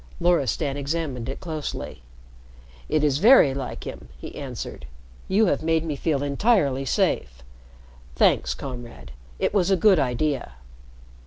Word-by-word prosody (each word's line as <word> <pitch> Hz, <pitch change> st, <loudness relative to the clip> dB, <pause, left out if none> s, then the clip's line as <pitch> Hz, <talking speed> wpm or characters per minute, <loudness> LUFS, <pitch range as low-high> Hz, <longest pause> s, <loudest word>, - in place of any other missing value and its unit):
Loristan 150 Hz, -, +1 dB
examined 140 Hz, -4 st, -3 dB
it 135 Hz, -, -5 dB
closely. 155 Hz, -, -5 dB, 0.9 s
"It 155 Hz, -1 st, +1 dB
is 145 Hz, -2 st, +2 dB
very 210 Hz, -, +7 dB
like 135 Hz, 0 st, -5 dB
him," -, -, -8 dB
he -, -, -9 dB
answered. 65 Hz, -, -7 dB, 0.4 s
"You 210 Hz, +4 st, +3 dB
have 180 Hz, -, +1 dB
made 160 Hz, 0 st, +1 dB
me 155 Hz, -3 st, -2 dB
feel 145 Hz, -1 st, -1 dB
entirely 140 Hz, -, +1 dB
safe. 65 Hz, -, -1 dB, 0.7 s
Thanks, 60 Hz, 0 st, +2 dB
Comrade. 120 Hz, -, -8 dB, 0.3 s
It -, -, 0 dB
was 195 Hz, -3 st, +2 dB
a 195 Hz, -, +3 dB
good 190 Hz, -1 st, +5 dB
idea." 135 Hz, -, -1 dB
145 Hz, 135 wpm, -24 LUFS, 125-170 Hz, 0.9 s, very